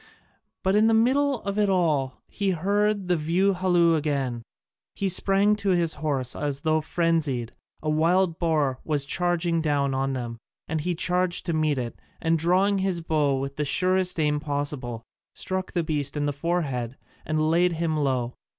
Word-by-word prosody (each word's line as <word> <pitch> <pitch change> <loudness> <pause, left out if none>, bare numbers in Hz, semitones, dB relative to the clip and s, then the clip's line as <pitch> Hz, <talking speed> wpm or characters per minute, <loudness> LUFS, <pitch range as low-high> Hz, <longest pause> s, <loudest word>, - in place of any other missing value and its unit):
But 190 +1 +2
in 215 +1 +5
the 225 - +4
middle 265 +3 +2
of 200 +1 -3
it 205 -1 +2
all 155 -8 0
he 200 -2 -2
heard 200 +3 0
the 180 - +2
view 175 +5 +1
halloo 175 -2 +3
again: 140 -6 -1 0.5
he 200 - -1
sprang 195 +2 +3
to 200 -1 -2
his 170 -2 +2
horse 135 -5 -1
as 145 -1 -3
though 155 0 +1
frenzied 155 -8 -1 0.3
a 155 - -1
wild 170 +2 +2
boar 150 -6 +1
was 145 -3 0
charging 170 +1 0
down 145 -3 0
on 135 +1 -1
them, 120 -3 -5 0.3
and 160 0 -2
he 175 +3 -1
charged 180 +1 +1
to 170 - -1
meet 155 -2 +1
it, 120 -2 -5 0.2
and 165 0 +1
drawing 190 +4 +2
his 190 -3 -1
bow 150 -4 +1
with 135 +1 -5
the 150 - 0
surest 185 +3 +1
aim 150 -1 +1
possible, 145 -5 -3 0.3
struck 185 0 -3
the 175 - 0
beast 150 -2 -2
in 145 - 0
the 145 - -1
forehead, 140 -6 -2 0.3
and 155 0 -1
laid 175 +1 +3
him 165 -1 -1
low. 130 -5 -1
160 Hz, 175 wpm, -25 LUFS, 145-185 Hz, 0.5 s, in